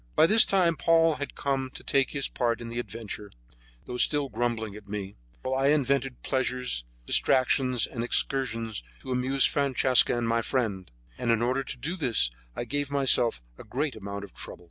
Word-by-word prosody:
By 155 Hz, -, +6 dB
this 215 Hz, +6 st, +7 dB
time 175 Hz, -4 st, +2 dB
Paul 165 Hz, -2 st, +3 dB
had 140 Hz, -, -6 dB
come 135 Hz, -2 st, -2 dB
to -, -, -8 dB
take 135 Hz, -1 st, +2 dB
his 140 Hz, -2 st, -1 dB
part 120 Hz, -2 st, -1 dB
in 115 Hz, -, -7 dB
the 120 Hz, +1 st, -4 dB
adventure, 105 Hz, -2 st, -7 dB, 0.5 s
though 125 Hz, -, -5 dB
still 145 Hz, +2 st, +2 dB
grumbling 115 Hz, -2 st, -2 dB
at 105 Hz, -1 st, -12 dB
me, 100 Hz, -1 st, -5 dB, 0.3 s
while 130 Hz, -, -2 dB
I 135 Hz, +1 st, +1 dB
invented 135 Hz, -3 st, 0 dB
pleasures, 125 Hz, -, -1 dB, 0.2 s
distractions 130 Hz, -, +3 dB
and 115 Hz, -2 st, -5 dB
excursions 115 Hz, -4 st, -1 dB, 0.2 s
to 130 Hz, -, -7 dB
amuse 130 Hz, +2 st, +2 dB
Francesca 130 Hz, -3 st, +3 dB
and 120 Hz, -1 st, -1 dB
my 115 Hz, 0 st, +1 dB
friend; 110 Hz, -7 st, -2 dB, 0.3 s
and 120 Hz, -, -2 dB
in 115 Hz, 0 st, +2 dB
order 130 Hz, +3 st, 0 dB
to 130 Hz, -, -6 dB
do 160 Hz, +9 st, -4 dB
this 120 Hz, -, +2 dB, 0.2 s
I -, -, -3 dB
gave 145 Hz, +3 st, -2 dB
myself 130 Hz, -, +3 dB, 0.2 s
a -, -, -9 dB
great 140 Hz, 0 st, -3 dB
amount 100 Hz, -1 st, -6 dB
of 100 Hz, -, -11 dB
trouble. -, -, -8 dB
125 Hz, 185 wpm, -27 LUFS, 115-140 Hz, 0.5 s, this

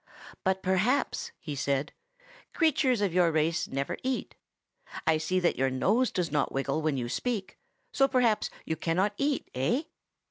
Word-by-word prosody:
"But 190 Hz, 0 st, 0 dB
perhaps," 230 Hz, -, +1 dB
he 150 Hz, -, -6 dB
said, 140 Hz, 0 st, -1 dB, 0.6 s
"creatures 270 Hz, -, +3 dB
of 195 Hz, -4 st, +1 dB
your 175 Hz, -2 st, +4 dB
race 160 Hz, +2 st, +1 dB
never 135 Hz, +1 st, -3 dB
eat. 260 Hz, 0 st, -2 dB, 0.7 s
I 160 Hz, -1 st, +3 dB
see 185 Hz, +4 st, 0 dB
that 175 Hz, -, +1 dB
your 135 Hz, 0 st, +3 dB
nose 210 Hz, -, +2 dB
does 175 Hz, -4 st, -2 dB
not 145 Hz, -2 st, +1 dB
wiggle 135 Hz, +3 st, -1 dB
when 155 Hz, -3 st, 0 dB
you 120 Hz, -2 st, -2 dB
speak, 200 Hz, -, -3 dB, 0.3 s
so 270 Hz, -8 st, +4 dB
perhaps 245 Hz, -5 st, +2 dB, 0.2 s
you 160 Hz, -, -1 dB
cannot 185 Hz, +6 st, 0 dB
eat, 285 Hz, 0 st, 0 dB
eh?" 140 Hz, -, +1 dB
180 Hz, 155 wpm, -29 LUFS, 150-245 Hz, 0.7 s, your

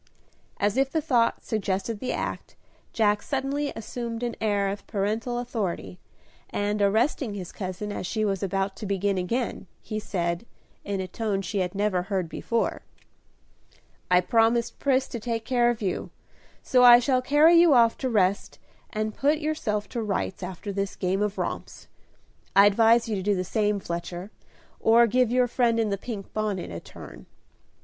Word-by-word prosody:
As 205 Hz, +4 st, +1 dB
if 270 Hz, 0 st, +2 dB
the 320 Hz, -, +1 dB
thought 245 Hz, -7 st, +1 dB
suggested 205 Hz, 0 st, -2 dB
the 255 Hz, -, -3 dB
act, -, -, -4 dB, 0.4 s
Jack 210 Hz, -2 st, +2 dB
suddenly 280 Hz, +1 st, -2 dB
assumed 230 Hz, +1 st, -5 dB
an 240 Hz, -1 st, -2 dB
air 205 Hz, -2 st, +1 dB
of 200 Hz, +1 st, -6 dB
paternal 220 Hz, +4 st, -1 dB
authority, 200 Hz, -, -4 dB, 0.5 s
and, 205 Hz, 0 st, -1 dB
arresting 220 Hz, +3 st, +1 dB
his 185 Hz, -3 st, -6 dB
cousin 190 Hz, +2 st, -5 dB
as 185 Hz, -, -4 dB
she 215 Hz, +1 st, -1 dB
was 195 Hz, -2 st, -1 dB
about 195 Hz, 0 st, -1 dB
to 210 Hz, -, -6 dB
begin 200 Hz, 0 st, 0 dB
again, 230 Hz, +2 st, -2 dB
he 215 Hz, -, -5 dB
said, 170 Hz, -3 st, -2 dB, 0.4 s
in 200 Hz, -1 st, -2 dB
a 185 Hz, -, -4 dB
tone 205 Hz, -2 st, -2 dB
she 195 Hz, +3 st, -2 dB
had 180 Hz, 0 st, -2 dB
never 200 Hz, -3 st, +1 dB
heard 190 Hz, -2 st, -2 dB
before, 230 Hz, +7 st, -2 dB, 1.3 s
"I 180 Hz, 0 st, +5 dB
promised 230 Hz, +4 st, +2 dB
Pris 265 Hz, -1 st, +2 dB
to 235 Hz, -, -6 dB
take 225 Hz, 0 st, -3 dB
care 240 Hz, -1 st, +3 dB
of 230 Hz, -2 st, -2 dB
you, 185 Hz, -, -2 dB, 0.5 s
so 250 Hz, -1 st, +4 dB
I 240 Hz, -1 st, +10 dB
shall 255 Hz, +1 st, +1 dB
carry 295 Hz, +5 st, +5 dB
you 335 Hz, -4 st, +6 dB
off 230 Hz, -2 st, +5 dB
to 260 Hz, -, -1 dB
rest, 200 Hz, -4 st, +1 dB, 0.3 s
and 215 Hz, 0 st, -3 dB
put 290 Hz, +6 st, +2 dB
yourself 295 Hz, -10 st, -2 dB
to 235 Hz, -, -3 dB
rights 200 Hz, -3 st, -2 dB
after 190 Hz, +2 st, -6 dB
this 195 Hz, 0 st, -2 dB
game 190 Hz, +1 st, -1 dB
of 210 Hz, -1 st, -1 dB
romps. -, -, -5 dB, 0.7 s
I 200 Hz, -, +8 dB
advise 225 Hz, +3 st, +4 dB
you 220 Hz, -, -1 dB
to -, -, -3 dB
do 205 Hz, +2 st, +1 dB
the 185 Hz, -, -1 dB
same, 210 Hz, +2 st, 0 dB
Fletcher, 175 Hz, +2 st, -5 dB, 0.5 s
or 230 Hz, +1 st, +5 dB
give 250 Hz, +1 st, +2 dB
your 250 Hz, +1 st, +3 dB
friend 240 Hz, -1 st, +1 dB
in 220 Hz, -2 st, +1 dB
the 200 Hz, -, 0 dB
pink 210 Hz, -4 st, -7 dB
bonnet 210 Hz, -, -2 dB
a 85 Hz, -, -5 dB
turn." -, -, -12 dB
215 Hz, 170 wpm, -26 LUFS, 195-240 Hz, 1.3 s, I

